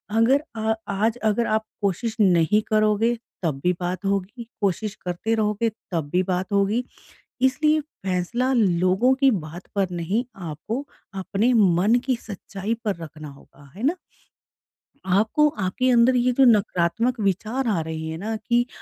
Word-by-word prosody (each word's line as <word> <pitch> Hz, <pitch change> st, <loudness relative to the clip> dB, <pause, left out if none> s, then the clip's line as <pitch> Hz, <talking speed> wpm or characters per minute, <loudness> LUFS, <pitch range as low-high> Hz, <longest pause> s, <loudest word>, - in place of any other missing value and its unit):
अगर 255 Hz, +6 st, +4 dB
अ 220 Hz, 0 st, +1 dB, 0.2 s
आज 220 Hz, +4 st, 0 dB
अगर 220 Hz, +2 st, +1 dB
आप 220 Hz, 0 st, 0 dB, 0.2 s
कोशिश 205 Hz, +3 st, -1 dB
नहीं 185 Hz, +1 st, +4 dB
करोगे 215 Hz, +2 st, +2 dB, 0.3 s
तब 150 Hz, -5 st, -1 dB
भी 180 Hz, -, +3 dB
बात 180 Hz, +2 st, -3 dB
होगी। 200 Hz, +4 st, -2 dB, 0.2 s
कोशिश 200 Hz, +2 st, -1 dB
करते 180 Hz, +5 st, -1 dB
रहोगे 215 Hz, +1 st, 0 dB, 0.2 s
तब 160 Hz, -5 st, -2 dB
भी 180 Hz, +1 st, +3 dB
बात 185 Hz, +2 st, -2 dB
होगी। 200 Hz, +5 st, +2 dB, 0.6 s
इसलिए 305 Hz, +4 st, +3 dB
फ़ैसला 235 Hz, -, -2 dB
लोगों 190 Hz, +3 st, +3 dB
की 275 Hz, -1 st, +6 dB
बात 175 Hz, -4 st, -5 dB
पर 195 Hz, -2 st, +1 dB
नहीं 180 Hz, +8 st, -1 dB, 0.2 s
आपको 185 Hz, -, -4 dB, 0.4 s
अपने 200 Hz, +6 st, +1 dB
मन 200 Hz, 0 st, +4 dB
की 260 Hz, -1 st, +1 dB
सच्चाई 205 Hz, +1 st, -5 dB
पर 205 Hz, -4 st, 0 dB
रखना 155 Hz, -1 st, -9 dB
होगा। 140 Hz, 0 st, -17 dB
है 210 Hz, -, -8 dB
ना? 345 Hz, +5 st, +1 dB, 1.1 s
आपको 215 Hz, +11 st, +3 dB, 0.2 s
आपके 255 Hz, +8 st, +1 dB
अंदर 245 Hz, +1 st, +5 dB
ये 250 Hz, +1 st, +2 dB
जो 270 Hz, +2 st, +4 dB
नकारात्मक 220 Hz, +1 st, +2 dB
विचार 215 Hz, +6 st, -1 dB
आ 200 Hz, -6 st, +1 dB
रहे 160 Hz, 0 st, -4 dB
हैं 160 Hz, 0 st, -5 dB
ना 220 Hz, +4 st, -3 dB
कि 240 Hz, +2 st, +1 dB
210 Hz, 155 wpm, -23 LUFS, 180-235 Hz, 1.1 s, की